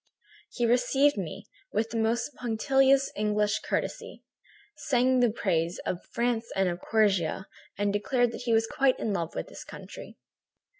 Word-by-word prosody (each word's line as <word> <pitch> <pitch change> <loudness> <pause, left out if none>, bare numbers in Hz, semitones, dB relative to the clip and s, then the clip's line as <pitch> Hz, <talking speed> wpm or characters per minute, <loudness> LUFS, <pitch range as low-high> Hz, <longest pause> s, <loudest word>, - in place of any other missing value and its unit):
"He 240 - 0
received 250 +4 +3
me 185 -7 -5 0.3
with 220 +2 -1
the 230 - -2
most 230 +5 0
punctilious 270 +3 +2
English 210 0 +1
courtesy, - - -4 0.5
sang 255 -2 +2
the 245 -1 +4
praises 175 -6 -1
of 180 - -3
France 235 -1 -1
and 190 -1 +2
of 175 0 -3
Corsica, 195 -5 +1 0.3
and 205 0 0
declared 245 +3 +1
that - - -7
he 235 - 0
was 225 0 +3
quite 265 +3 +2
in 215 - -2
love 170 -4 -3
with - - -4
this - - -9
country. - - -11
225 Hz, 155 wpm, -28 LUFS, 205-245 Hz, 0.5 s, the